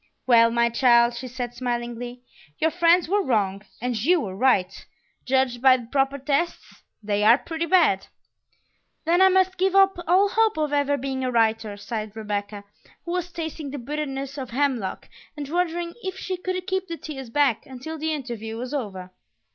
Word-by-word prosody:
"Well, 230 -2 +6
my 235 0 +2
child," 235 0 +4
she 255 +2 -6
said 245 -1 -5
smilingly, 240 0 -4 0.3
"your 320 - +1
friends 340 0 +4
were 405 +4 +2
wrong 200 - 0 0.2
and 245 +1 -2
you 320 +12 +3
were 190 -9 -5
right; 195 -5 +1 0.4
judged 260 -2 +1
by 260 -1 +6
the 245 - -9
proper 270 +3 0
tests, 280 +5 -2 0.2
they 205 0 0
are 230 +3 +7
pretty 330 +2 -4
bad." 330 - +3 1.0
"Then 345 +3 +3
I 380 - +7
must 375 -1 +2
give 380 +1 +2
up 390 -2 +5
all 380 +4 +4
hope 445 -1 +2
of 300 -1 -1
ever 285 0 +2
being 265 0 -3
a 255 - 0
writer!" 225 -3 +1
sighed 215 0 -5
Rebecca, 205 -1 -4 0.4
who 340 - -4
was 355 0 -2
tasting 320 -3 -5
the 285 - -6
bitterness 275 +1 -4
of 260 -2 -6
hemlock 255 -6 -1 0.3
and 290 -1 -5
wondering 345 0 -1
if 375 -2 -5
she 380 0 -3
could 365 0 -4
keep 380 0 -2
the 335 -1 -5
tears 270 -7 -8
back 270 -2 +1
until 270 +5 -7
the 315 +1 -1
interview 235 -6 -5
was 250 +4 -5
over. 190 -9 -5
270 Hz, 180 wpm, -24 LUFS, 235-335 Hz, 1.0 s, are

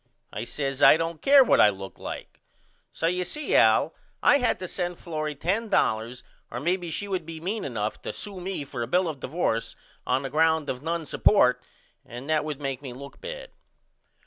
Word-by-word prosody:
I - - -4
says 135 0 -3
I - - +8
don't 165 -1 -3
care 275 0 +7
what - - +4
I 105 - +7
look 95 -1 -8
like. - - -8 0.5
So - - -3
you 180 +2 +1
see 305 - -3
Al - - +5 0.3
I 285 - +6
had 250 - +1
to 185 - -6
send 175 -1 -3
Florrie 155 -3 -4
$10.00 140 - 0 0.3
or 120 - -5
maybe 175 +4 -1
she 205 +5 -3
would 185 -3 -2
be 160 0 -8
mean 200 +6 -3
enough 110 -5 -3
to - - -4
sew 200 -3 -7
me 185 -4 -4
for 135 -3 -6
a 115 - -2
bill 180 +7 +2
of 155 -4 -4
divorce 130 -7 -2 0.3
on 130 +2 +1
the 135 - -5
ground 160 0 +2
of 125 - -7
none 165 +1 -2
support 125 -9 +3 0.4
and 120 +3 -9
that 155 -1 +2
would 150 -2 -5
make 135 -2 -3
me 130 -4 -7
look 140 +2 -11
bad. - - -7
160 Hz, 200 wpm, -26 LUFS, 130-180 Hz, 0.5 s, I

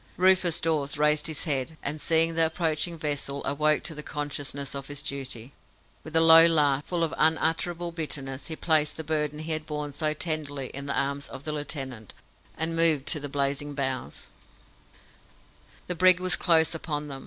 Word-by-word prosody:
Rufus 185 -2 +3
Dawes 150 -3 -1
raised 150 +1 +3
his 155 -3 -2
head, 150 0 -1
and, 150 +1 -3
seeing 165 0 +3
the 165 0 +3
approaching 160 0 -1
vessel, 145 -2 -2
awoke 150 +1 +1
to 165 - -4
the 150 - -6
consciousness 145 -2 -4
of 140 -1 -6
his 145 0 -3
duty. 135 -2 -4 0.5
With 155 0 -10
a 165 - +5
low 165 0 +9
laugh, 145 -4 +2
full 175 -2 -2
of 165 - -1
unutterable 165 +2 +1
bitterness, 140 -5 -4
he 160 - -5
placed 155 -2 +1
the 160 - -5
burden 150 -1 -2
he 155 +1 -5
had 155 -1 -2
borne 150 -1 -4
so 155 +1 -1
tenderly 145 -4 -3
in 140 +1 -5
the 140 - +1
arms 140 0 -2
of 135 0 -10
the 155 - -3
lieutenant, 135 - -6 0.4
and 165 +1 -1
moved 160 -4 +2
to 155 - +4
the 145 0 -6
blazing 140 +1 -1
bows. 130 - -4 1.5
The 180 - -2
brig 185 +1 +5
was 185 0 +2
close 165 -2 +3
upon 150 -2 -4
them. 135 -2 -6
150 Hz, 180 wpm, -26 LUFS, 140-160 Hz, 1.5 s, low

